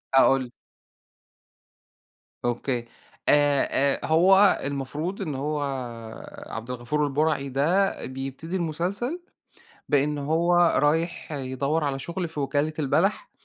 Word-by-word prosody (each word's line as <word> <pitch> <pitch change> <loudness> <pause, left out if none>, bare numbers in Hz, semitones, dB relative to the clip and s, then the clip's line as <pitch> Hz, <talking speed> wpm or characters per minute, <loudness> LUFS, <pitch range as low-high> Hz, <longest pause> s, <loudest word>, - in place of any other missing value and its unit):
أقول 135 -1 +5
لِك. 120 - -14 1.9
أوكي. 120 0 -1 0.4
آآ، 145 -1 +4 0.3
آآ - - -4
هو 190 +5 +5
المفروض 145 +8 -3
إن 155 -7 -3
هو 150 +2 -2 0.9
عبد 115 +2 -7
الغفور 125 +5 -1
البُرَعي 145 -1 0
ده، 170 +9 +1
بيبتدي 135 +7 -5
المسلسل 190 - -2 0.7
بإن 145 +1 +2
هو 165 +5 +1
رايح 165 -1 +2
يدوّر 140 +3 -1
على 135 -1 -1
شغل 170 +4 -4
في 150 -2 -6
وكِالة 145 +3 0
البَلَح. 165 - +1
150 Hz, 105 wpm, -25 LUFS, 135-170 Hz, 1.9 s, أقول